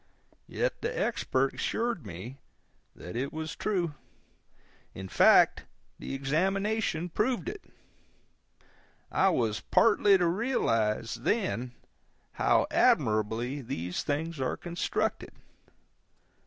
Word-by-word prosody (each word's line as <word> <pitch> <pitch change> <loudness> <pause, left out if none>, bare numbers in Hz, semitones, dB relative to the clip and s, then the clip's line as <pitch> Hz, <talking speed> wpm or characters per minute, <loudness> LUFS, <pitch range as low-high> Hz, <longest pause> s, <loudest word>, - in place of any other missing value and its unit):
Yet - - -2
the 475 +2 -2
Expert - - 0
assured 230 - -2
me 100 +10 -8 0.6
that 90 - -9
it 135 +3 -2
was 160 0 -5
true; 180 -7 -1 1.0
in 95 0 -6
fact, - - +5 0.3
the - - -5
examination 185 +5 0
proved 235 - -1
it. 400 +1 -6 1.5
I 195 - +3
was 115 - 0
partly 205 -3 +4
to 180 - +1
realize, 115 - 0
then, 125 - -1 0.6
how - - +2
admirably 110 +6 +2
these 90 -7 -4
things 155 +2 -3
are 130 - -1
constructed. 175 0 -2
155 Hz, 100 wpm, -29 LUFS, -, 1.5 s, fact